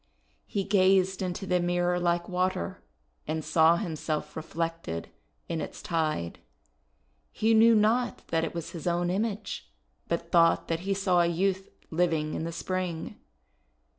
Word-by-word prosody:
He 200 - -1
gazed 190 -1 +3
into 185 +1 -3
the 180 -1 +2
mirror 175 0 +1
like 175 0 0
water, 180 - -2 0.4
and 155 0 -2
saw 165 0 +5
himself 160 -5 -3
reflected 165 - -4 0.4
in 165 -1 -2
its - - -6
tide. 155 - -2 0.9
He 225 +1 +2
knew 225 +1 +7
not 230 +3 +2
that 165 0 +1
it 165 - -3
was 170 -2 -5
his 170 0 -6
own 175 0 +1
image, 205 - -3 0.4
but 170 0 -3
thought 165 -1 +4
that 165 -1 0
he 195 +2 -1
saw 185 -3 +3
a 170 - +3
youth 190 +3 0 0.2
living 160 -2 +1
in 160 - -3
the 165 - -3
spring. 175 -1 -3
175 Hz, 145 wpm, -28 LUFS, 165-190 Hz, 0.9 s, knew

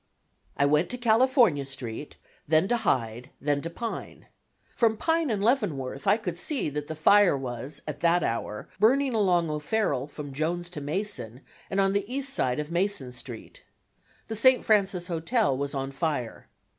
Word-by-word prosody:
I 140 - +3
went 150 +4 +2
to 250 - -3
California 240 - +4
Street, 135 0 -7 0.3
then 160 +4 +3
to 240 - +2
Hyde, 125 - -1
then 145 0 0
to 165 - -4
Pine. 230 +7 -6 0.5
From 225 -2 +2
Pine 325 +1 +1
and 205 -3 -1
Leavenworth 155 - 0
I - - +5
could 180 -6 -5
see 265 - -1
that 145 0 -5
the 160 - -5
fire 190 +1 +5
was 130 +1 -6
at 150 -1 -5
that 170 0 +3
hour 105 -2 -3
burning 260 +5 +3
along 180 -7 +2
O'Farrell 150 -3 -1
from 145 -1 -8
Jones 175 +4 -2
to 150 - -6
Mason 145 - -2 0.3
and 195 - -1
on 195 0 +3
the 200 +3 -2
east 275 +1 -1
side 125 - 0
of 150 +2 -4
Mason 175 -7 0
Street. 120 -2 -9 0.7
The 220 - -4
St. 255 +3 +4
Francis 195 -5 +2
Hotel 175 - +1
was 140 +1 -3
on 135 0 -3
fire. 135 -5 -3
170 Hz, 170 wpm, -27 LUFS, 140-215 Hz, 0.7 s, I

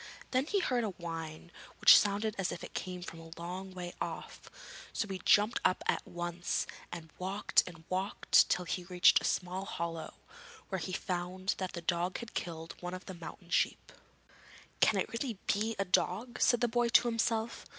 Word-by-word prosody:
Then 260 +3 +2
he 400 +1 +1
heard 250 -8 +1
a - - 0
whine 165 -1 -6 0.3
which - - +10
sounded 210 +1 +3
as 190 - 0
if 175 - -6
it - - -8
came 180 -1 -4
from 165 -2 -8
a 165 0 -11
long 185 +3 -5
way 175 -1 -5
off, - - -6 0.4
so 220 - -1
he 190 -2 -5
jumped 210 +3 +4
up 185 - +2
at - - +1
once 175 0 -2 0.3
and 160 -2 -8
walked 195 +3 +2
and 165 -3 -10
walked 190 +2 +3
till 180 - +1
he 180 - -2
reached 180 0 +5
a - - -3
small 185 +1 -1
hollow, 165 -3 -4 0.5
where 190 - -1
he 165 +2 -4
found 180 +1 -2
that 185 -1 -3
the 170 - -5
dog 175 +2 0
had 235 -2 -8
killed 165 -1 -4
one 180 +1 -4
of 185 - -9
the 190 - -7
mountain 175 +1 -10
sheep. - - +1 0.9
'Can - - +4
it - - 0
really 230 -2 -3
be 220 +2 +1
a 195 - 0
dog?' 205 +6 0
said 240 0 +4
the 240 - +4
boy 240 +1 +1
to 235 - +5
himself. 230 0 -1
185 Hz, 190 wpm, -32 LUFS, 175-215 Hz, 0.9 s, which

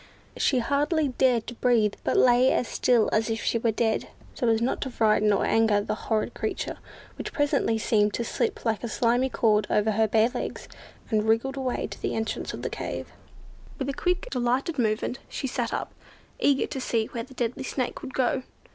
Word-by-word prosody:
She 265 - +2
hardly 290 +4 +1
dared 250 -3 +2
to 240 - -6
breathe, 230 -4 +2
but - - +1
lay 250 +1 +5
as 245 - +1
still 240 -3 +2
as 220 +1 +2
if 225 0 -2
she 230 - +1
were 230 - +1
dead, 220 0 0 0.3
so 245 - -1
as 225 -1 +3
not 240 +3 -1
to 265 - -2
frighten 215 -3 +3
or 200 - +2
anger 225 -2 +3
the 205 - -2
horrid 215 0 -1
creature, - - -3 0.4
which - - -4
presently 285 -6 +1
seemed 210 -1 +2
to 235 - -1
slip 415 - -2
like 225 -1 0
a - - -1
slimy 245 +3 +1
cord 215 -4 +2
over 210 +1 +2
her 220 +1 +2
bare 220 +1 +4
little 245 - -2
legs, - - -6 0.4
and 215 0 +1
wriggled 235 +5 +2
away 260 -2 -2
to - - -9
the - - -2
entrance 220 0 -3
of - - -7
the - - -1
cave. - - -5 0.7
With 275 -1 -3
a - - -1
quick, 360 +5 -1
delighted 255 +4 0
movement, 225 +2 0
she - - -4
sat 245 -3 -2
up, - - -3 0.5
eager 280 -1 +3
to 265 - -5
see 230 -3 0
where 235 - -3
the 265 - -14
deadly 245 +2 -2
Snake 255 -1 -3
would 260 - -8
go. 260 0 +1
235 Hz, 205 wpm, -26 LUFS, 220-260 Hz, 0.7 s, lay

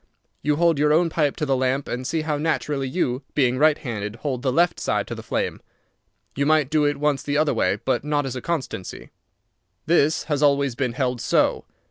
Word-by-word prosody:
You 150 0 +1
hold 165 -1 +2
your 150 0 +3
own 165 +2 +3
pipe 150 -4 +1
to 155 - -2
the 135 -2 +1
lamp, 130 +2 0
and 125 +1 -4
see 160 +2 -1
how 155 -2 -2
naturally 145 -3 -1
you, 130 -4 -1
being 130 -3 +2
right 155 0 +4
handed, 105 -4 -5
hold 125 +1 -3
the 130 - 0
left 175 +6 +2
side - - -1
to - - -6
the - - -7
flame. - - -3 0.7
You 140 +1 0
might 155 -2 +3
do 150 -1 +3
it 145 -1 +1
once 145 -2 0
the 145 0 -1
other 155 -1 +2
way, - - +1
but 130 -1 0
not 145 -1 0
as 130 -1 -4
a 125 - -4
constancy. 135 - -5 0.7
This 155 -2 +2
has 145 -3 -2
always 140 -2 +3
been 125 -1 -2
held 125 -2 -1
so. - - +1
145 Hz, 210 wpm, -23 LUFS, 130-155 Hz, 0.7 s, right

